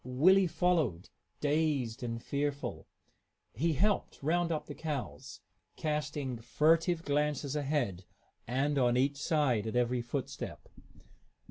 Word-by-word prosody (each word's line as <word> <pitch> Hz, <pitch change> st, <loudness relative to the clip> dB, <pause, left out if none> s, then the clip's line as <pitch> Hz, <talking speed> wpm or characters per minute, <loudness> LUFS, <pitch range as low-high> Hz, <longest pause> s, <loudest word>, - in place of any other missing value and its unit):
Willie 180 Hz, +10 st, +4 dB
followed, 160 Hz, -, +1 dB, 0.3 s
dazed 145 Hz, -6 st, +1 dB
and 115 Hz, -1 st, -3 dB
fearful. 140 Hz, +3 st, -3 dB, 0.7 s
He 160 Hz, +8 st, +1 dB
helped 200 Hz, +8 st, +1 dB
round 170 Hz, +3 st, +1 dB
up 155 Hz, -, -2 dB
the 145 Hz, -, -7 dB
cows, 140 Hz, -, -5 dB, 0.3 s
casting 145 Hz, -5 st, -2 dB
furtive 160 Hz, +7 st, +2 dB
glances 145 Hz, -1 st, 0 dB
ahead 135 Hz, -, -1 dB, 0.4 s
and 140 Hz, +4 st, +1 dB
on 120 Hz, -1 st, +3 dB
each 140 Hz, +2 st, +2 dB
side 140 Hz, -8 st, +1 dB
at 110 Hz, -, -3 dB
every 125 Hz, 0 st, +2 dB
footstep. 125 Hz, +3 st, -5 dB
145 Hz, 115 wpm, -32 LUFS, 125-155 Hz, 0.7 s, Willie